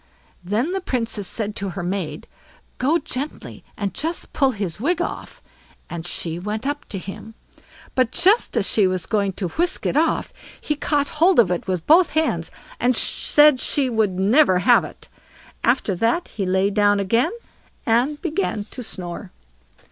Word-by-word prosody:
Then 215 - -1
the 385 0 -2
Princess 230 - -2
said 210 0 -2
to 200 -1 -3
her 175 0 -5
maid: 180 -2 -4 0.5
"Go 290 +7 +2
gently, 285 -2 -5
and 200 -3 -3
just 330 +2 -4
pull 275 -3 +3
his 200 -7 -4
wig 330 +8 0
off"; 345 - -5 0.5
and 170 0 -5
she 165 -1 -2
went 210 +6 -4
up 290 +1 -3
to 200 - -4
him. 200 +4 -9 0.6
But 255 -3 +2
just 380 - +3
as 210 - +2
she 205 -4 +3
was 185 -2 -1
going 200 -3 0
to 180 -1 -4
whisk 345 - -1
it - - 0
off, 320 +2 +1 0.3
he 300 - -2
caught 285 -1 0
hold 360 +1 +5
of 210 -7 +5
it 180 - -2
with 180 -3 -2
both 330 +2 +5
hands, 290 - 0 0.3
and 250 +1 +2
said 295 +3 +4
she 260 -4 0
should 210 -5 +1
never 200 +2 +4
have 235 +7 +4
it. - - -11 0.6
After 240 -4 +2
that 230 - 0
he 195 -3 -4
lay 190 +2 +2
down 205 0 +3
again, 230 +5 +2 0.6
and 250 +6 +1
began 315 - -2
to 255 - -7
snore. 180 -3 -5
225 Hz, 170 wpm, -22 LUFS, 195-290 Hz, 0.6 s, hold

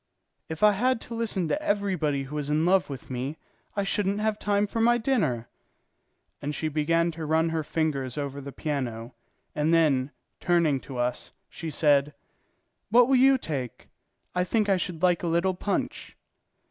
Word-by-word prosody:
"If 160 +4 -5
I 210 - +8
had 250 +5 +1
to 235 - -7
listen 215 -6 -1
to 300 - 0
everybody 185 - 0
who 135 +2 -10
was 145 -1 -3
in 155 +2 +2
love 185 -1 +3
with 135 -1 -8
me, 130 +5 -3 0.4
I 200 - 0
shouldn't 200 0 0
have 215 0 0
time 205 0 +1
for 225 +2 -3
my 240 +1 +4
dinner." 165 - 0 0.9
And 145 +1 -3
she 155 - -2
began 165 +3 +1
to 160 -1 -6
run 160 +1 +2
her 160 -1 -1
fingers 145 -5 -2
over 140 -1 -4
the 140 +1 -7
piano, 125 -5 -4 0.4
and 150 +2 +1
then, 150 -5 +3 0.3
turning 170 -6 +2
to 130 -1 -9
us, 120 0 -2 0.2
she 165 - -6
said: 145 -1 +2 0.7
"What 240 +3 +5
will 270 - +5
you 265 +1 +6
take? 135 - -5 0.4
I 180 - +1
think 210 +2 0
I 195 - +4
should 175 -1 -4
like 180 -2 +3
a 175 - -2
little 170 +3 +1
punch." 195 +2 -3
165 Hz, 175 wpm, -27 LUFS, 145-200 Hz, 0.9 s, I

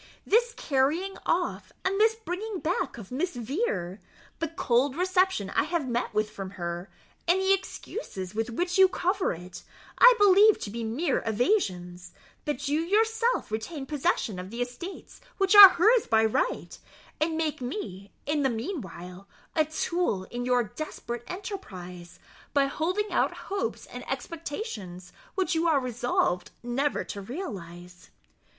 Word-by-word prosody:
This 470 +2 +3
carrying 310 +8 0
off - - -1
and 390 +1 +1
this 445 0 +5
bringing 435 -1 -5
back 335 -4 -2
of 215 -2 -10
Miss 300 +5 -2
Vere, 225 - -2 0.4
the 330 - 0
cold 265 -3 +1
reception 365 - +1
I - - +2
have 315 -3 -1
met 240 -1 -1
with 215 0 0
from 195 -1 -6
her, 175 +1 -4 0.4
and 355 +3 +4
the 380 0 +4
excuses 370 - -5
with 225 +2 -2
which 350 +10 -1
you 380 - +9
cover 370 +1 0
it, 175 +1 -8 0.4
I - - +9
believe 410 +1 +6
to 200 - -5
be 230 +1 -4
mere 260 +7 0
evasions, 195 - -1 0.3
that 295 -3 -2
you 295 +3 +1
may 335 - -4
yourself 450 - +1
retain 270 +7 -4
possession 275 - -1
of 180 +1 -7
the 235 +3 -2
estates 250 - -9 0.2
which 390 0 +2
are 405 -2 +14
hers 410 +6 +3
by 225 0 +4
right, 360 - -1 0.4
and 315 +1 0
make 315 -4 -1
me, 200 - -6
in 295 +1 0
the 270 - +2
meanwhile, 195 - -6 0.3
a 310 -2 +4
tool 315 - -1
in 245 0 -3
your 250 -1 +3
desperate 240 -1 -6
enterprise, 180 - -8 0.4
by 280 -1 +5
holding 365 +9 -1
out - - +1
hopes 395 0 -2
and - - -9
expectations 230 - -6 0.2
which 375 -1 0
you 330 +1 +1
are 310 -4 +4
resolved 240 -7 0
never 265 +4 0
to 200 - -7
realize." 180 - -8
280 Hz, 150 wpm, -27 LUFS, -, 0.4 s, are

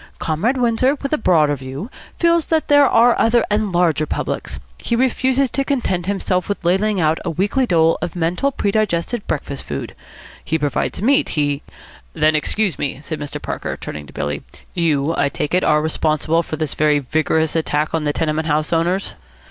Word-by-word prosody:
Comrade 195 - 0
Windsor, 250 +3 +2
with 275 - -2
a - - +3
broader 155 -8 +3
view, 135 - -7 0.3
feels 335 -1 +2
that 320 -1 0
there 290 -1 +6
are 235 0 +5
other 230 +1 +3
and 210 -1 +1
larger 170 -3 +2
publics. - - -3 0.2
He 235 - -1
refuses 260 +1 +1
to 275 - 0
content 195 - -1
himself 190 -2 -1
with 200 -3 -3
ladling 195 +3 +2
out 160 -1 +2
a 175 - -2
weekly 200 - 0
dole 165 -3 +3
of 175 0 -4
mental 175 +11 0
predigested 210 -1 -1
breakfast 140 -2 -3
food. 70 - -5 0.5
He 160 - 0
provides 145 +5 -2
meat. 275 +4 +3
He 145 -1 0 0.3
" 60 0 -23
"Then 155 0 +2
excuse 195 +4 0
me 140 -1 -2
" - - -22
said 155 0 -5
Mr. 150 0 -5
Parker, - - -4
turning 75 -1 -7
to - - -14
Billy, 75 0 -3 0.3
"You, 160 -3 +1
I - - +1
take 145 - -3
it, 180 - +3
are 150 0 +3
responsible 160 +1 +1
for 160 - -5
this 155 -2 -3
very 150 -1 +3
vigorous 155 +3 0
attack 155 -1 0
on 165 -1 0
the 145 - +1
tenement 155 +1 -1
house 155 +1 0
owners?" 175 +4 0
170 Hz, 190 wpm, -19 LUFS, 150-220 Hz, 0.5 s, there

